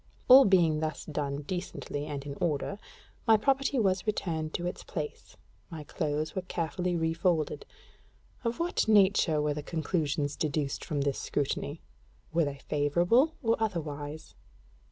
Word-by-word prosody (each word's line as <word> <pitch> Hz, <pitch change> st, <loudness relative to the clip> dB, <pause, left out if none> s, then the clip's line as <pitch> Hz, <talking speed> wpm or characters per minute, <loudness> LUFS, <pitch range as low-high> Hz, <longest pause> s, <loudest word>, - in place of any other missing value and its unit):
All 265 Hz, +2 st, +10 dB
being 170 Hz, -5 st, +4 dB
thus 155 Hz, -1 st, -3 dB
done 145 Hz, -2 st, -3 dB
decently 150 Hz, -3 st, -4 dB
and 140 Hz, -1 st, -5 dB
in 140 Hz, -, -5 dB
order, 170 Hz, +5 st, -1 dB, 0.5 s
my 220 Hz, -1 st, +7 dB
property 275 Hz, +4 st, +1 dB
was 195 Hz, -3 st, +1 dB
returned 160 Hz, -7 st, -1 dB
to 175 Hz, -, -2 dB
its 180 Hz, -, -4 dB
place, 150 Hz, -3 st, -6 dB, 0.3 s
my 160 Hz, -2 st, -7 dB
clothes 150 Hz, 0 st, -2 dB
were 190 Hz, -, -2 dB
carefully 175 Hz, 0 st, -2 dB
refolded. 165 Hz, -, 0 dB, 0.8 s
Of 235 Hz, 0 st, -2 dB
what 345 Hz, -6 st, 0 dB
nature 195 Hz, -7 st, +4 dB
were 150 Hz, 0 st, +1 dB
the 150 Hz, -, -4 dB
conclusions 150 Hz, -2 st, -1 dB
deduced 145 Hz, -2 st, -2 dB
from 145 Hz, -2 st, -2 dB
this 140 Hz, -1 st, 0 dB
scrutiny? 145 Hz, +2 st, -2 dB, 0.5 s
Were 165 Hz, -1 st, +3 dB
they 140 Hz, -1 st, -4 dB
favorable 175 Hz, -, +3 dB
or 230 Hz, 0 st, +3 dB
otherwise? 155 Hz, -7 st, -4 dB
160 Hz, 140 wpm, -29 LUFS, 150-190 Hz, 0.8 s, All